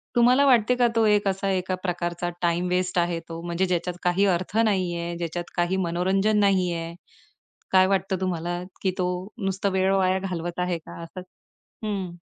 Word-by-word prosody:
तुम्हाला 250 +3 +5
वाटते 250 -2 +4
का, 245 -1 +4
तो 230 -1 +1
एक 205 -1 +3
असा 195 +1 -1
एका 185 0 -1
प्रकारचा 175 -1 -2
टाईम 175 +1 +1
वेस्ट 180 0 0
आहे 170 -1 +1
तो. 165 0 -6
म्हणजे 175 +2 0
ज्याच्यात 180 0 -1
काही 180 +3 +2
अर्थ 185 +4 -6
नाही 185 -5 +1
आहे. 170 0 -4
ज्याच्यात 175 0 -4
काही 175 +2 +1
मनोरंजन 195 +5 +1
नाही 190 -3 +3
आहे. 165 0 -4 0.8
काय 185 0 +6
वाटतं 190 -1 0
तुम्हाला, 175 -1 -2 0.2
की 190 - +2
तो 180 - +1 0.4
नुसता 195 +1 0
वेळ 190 +1 +3
वाया 190 -1 +2
घालवत 175 -2 -4
आहे 180 -1 0
का 160 - -11
असं? 165 +3 -8 0.7
हं. 190 -4 -3
185 Hz, 175 wpm, -25 LUFS, 175-195 Hz, 0.8 s, काय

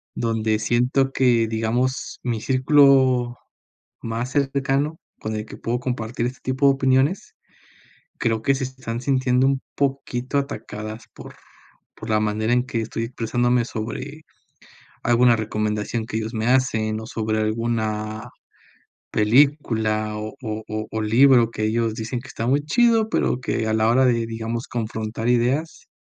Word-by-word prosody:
donde 110 -2 0
siento 125 +5 +1
que, 120 -4 +3
digamos, 115 +4 -1
mi 120 -3 -2
círculo 130 -1 +4 0.7
más 115 +3 -3
cercano 140 +2 0 0.2
con 110 0 -4
el 105 0 -4
que - - -10
puedo 120 +1 -2
compartir 120 -2 -3
este 125 +1 -7
tipo 130 +2 +2
de 140 - +6
opiniones, 135 +6 +1 0.8
creo 115 -1 0
que 135 - +3
se 135 0 -2
están 130 -3 -5
sintiendo 130 -1 +2
un 135 -1 +1 0.2
poquito 135 -1 -1
atacadas 110 -5 -5
por - - -11 0.6
por - - -8
la 110 0 +3
manera 110 +2 0
en 125 - +3
que 120 -3 -2
estoy 115 +1 -4
expresándome 120 +1 0
sobre 125 +7 -6 0.8
alguna 120 0 +4
recomendación 110 +1 -2
que 110 - -4
ellos 110 +1 -4
me 110 0 -1
hacen, 110 -4 +1
o - - -8
sobre 110 -1 -2
alguna 110 0 -2 0.8
película 110 -3 +2
o 110 0 -6
o 110 -1 -4
o 110 - -3
libro 120 +2 +5
que 110 - -3
ellos 115 0 0
dicen 115 +3 -4
que 130 - -13
está 115 - -4
muy 140 +4 +2
chido, 225 +5 +3
pero 125 - 0
que 115 -3 -2
a 110 - +1
la 110 0 +2
hora 130 +3 +4
de, 115 -2 +1
digamos, 115 +1 -4
confrontar 110 -1 -3
ideas, 125 +7 0
120 Hz, 150 wpm, -22 LUFS, 110-130 Hz, 0.8 s, de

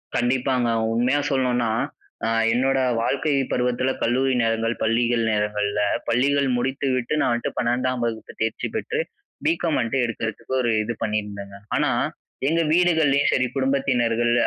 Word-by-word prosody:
கண்டிப்பாங்க! 125 0 +1 0.2
உண்மையா 125 +5 +2
சொல்லணும்னா. 125 -4 +1 0.6
அ - - +1 0.2
என்னோட 135 +3 +2 0.2
வாழ்க்கை 140 +5 0 0.2
பருவத்துல 125 +1 0
கல்லூரி 130 +3 +2
நேரங்கள், 115 0 0
பள்ளிகள் 115 +1 +2
நேரங்கள்ல, 105 -1 0 0.3
பள்ளிகள் 140 +3 +2
முடித்து 135 +3 -1
விட்டு 125 +3 -2
நான் - - +2
வந்துட்டு 120 0 -2
12 125 +1 0
வகுப்பு 110 -1 -4
தேர்ச்சி 110 0 -1
பெற்று - - -2 0.5
பி.காம் 165 0 +1
வந்துட்டு 125 +3 0
எடுக்கறதுக்கு 115 +1 -4
ஒரு 120 - 0
இது 120 +2 -3
பண்ணிருந்தங்க. 105 -2 -3 0.2
ஆனா, - - +2 0.6
எங்க 165 +2 +2
வீடுகள்லையும் 160 -5 +3
சரி. 130 - +2
குடும்பத்தினர்கள் 120 -4 +1
120 Hz, 130 wpm, -23 LUFS, 115-135 Hz, 0.6 s, வீடுகள்லையும்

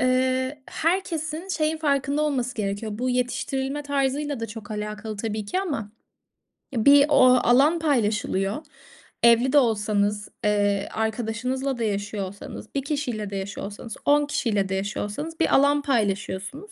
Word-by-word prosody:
eee, 260 +2 +1
herkesin 330 -1 -2
şeyin 315 -3 0
farkında 285 -1 +1
olması 255 -5 -1
gerekiyor. 205 +1 -3
Bu 255 0 0
yetiştirilme 265 +3 -1
tarzıyla 285 -1 -1
da 230 - -2
çok 220 +1 -9
alakalı 210 0 -5
tabii 215 0 -3
ki 365 - -1
ama 275 - -3 0.8
bir 280 +5 +6
o 285 - +6 0.2
alan 280 +8 +4
paylaşılıyor. 215 -4 0 0.6
Evli 235 +3 +5
de - - +6
olsanız, 210 -4 +1
eee, 205 -1 +1
arkadaşınızla 240 +4 -2
da 235 - -2
yaşıyor 205 -1 -2
olsanız, 200 +4 -10
bir 275 - +1
kişiyle 255 -8 -3
de 200 - -6
yaşıyor 195 0 -4
olsanız, 210 +2 -8
10 290 0 +4
kişiyle 210 -9 0
de 190 - -1
yaşıyor 200 +2 -2
olsanız 305 +11 -6
bir 325 - +3
alan 285 +1 +4
paylaşıyorsunuz. 220 - -2
245 Hz, 145 wpm, -25 LUFS, 210-285 Hz, 0.8 s, bir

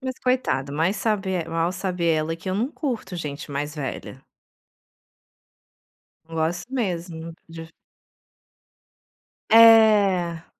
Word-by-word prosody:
Mas 260 -1 -5
coitada, 250 - 0
mas 165 +6 0
sabe 205 -4 -1
el 170 -3 -3
mal 165 +2 0
sabe 185 -2 -3
ela, 160 0 0
que 165 - -8
eu 185 - -1
não 230 +7 -1
curto 235 - -4
gente 150 -3 -6
mais 145 +2 -4
velha. 135 -2 -7 2.0
Não 165 0 -12
gosto 175 +8 -2
mesmo 170 -8 -4 0.2
de 165 0 -9 1.8
É. 210 -7 +5
175 Hz, 115 wpm, -23 LUFS, 160-215 Hz, 2.0 s, É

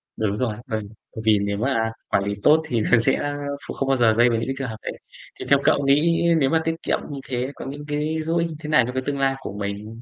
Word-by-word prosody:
Đúng 105 -2 -1
rồi. 110 -2 -1
Vâng, 110 -1 -2 0.3
bởi 110 - -5
vì 105 -2 +5
nếu 100 0 -1
mà 115 -2 0 0.2
quản 100 - +2
lý 100 +1 -2
tốt 155 +2 +6
thì 120 -5 0
nó 115 +2 +4
sẽ 115 - +2 0.5
kh - - -4
không 135 - -2
bao 135 - +3
giờ 115 -3 +4
dây 120 +2 +4
vào 115 - +1
những 115 - -2
cái 135 - -2
trường 135 -1 -3
hợp 110 - -6
đấy. - - -4 0.5
Thì - - -5
theo 140 - +6
cậu 140 - +3
nghĩ 160 +5 +3 0.2
nếu 135 -3 +3
mà 160 +2 +2
tiết 165 0 0
kiệm - - +1
như 140 -2 -5
thế 125 +1 -2
có - - -8
những 145 +2 -7
cái 150 +2 -1
dỗ 165 +2 0
ích 170 0 +1
như 160 - -7
thế 150 - -7
nào 150 -5 +5
cho 125 - -4
cái 130 - -1
tương 140 -1 -2
lai 135 0 +2
của 120 - -7
mình? 105 +3 -5
130 Hz, 290 wpm, -23 LUFS, 110-145 Hz, 0.5 s, tốt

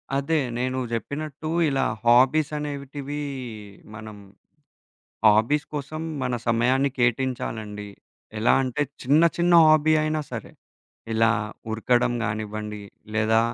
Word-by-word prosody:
అదే. 140 +4 +1 0.2
నేను 130 +1 -1
జెప్పినట్టూ 145 +6 -4 0.2
ఇలా 135 -1 +1 0.2
హాబీసనేటివీ 145 +2 +1 0.7
మనం 110 -1 -9 1.1
హాబీస్ 110 +8 +3
కోసం 150 +2 -5 0.2
మన 125 -1 -1
సమయాన్ని 125 +4 +2
కేటయించాలండి. 115 -4 -2 0.5
ఎలా 110 - +3
అంటే, 130 +3 -1 0.2
చిన్న 145 +5 +4
చిన్న 175 0 +2
హాబీ 155 0 +5
అయినా 155 0 0
సరే, 115 -3 -7 0.6
ఇలా 115 +1 +3 0.4
ఉరకడం 120 +2 +1
గానివ్వండి, 105 -1 -4 0.3
లేదా 110 +1 +3
130 Hz, 100 wpm, -24 LUFS, 110-145 Hz, 1.1 s, హాబీ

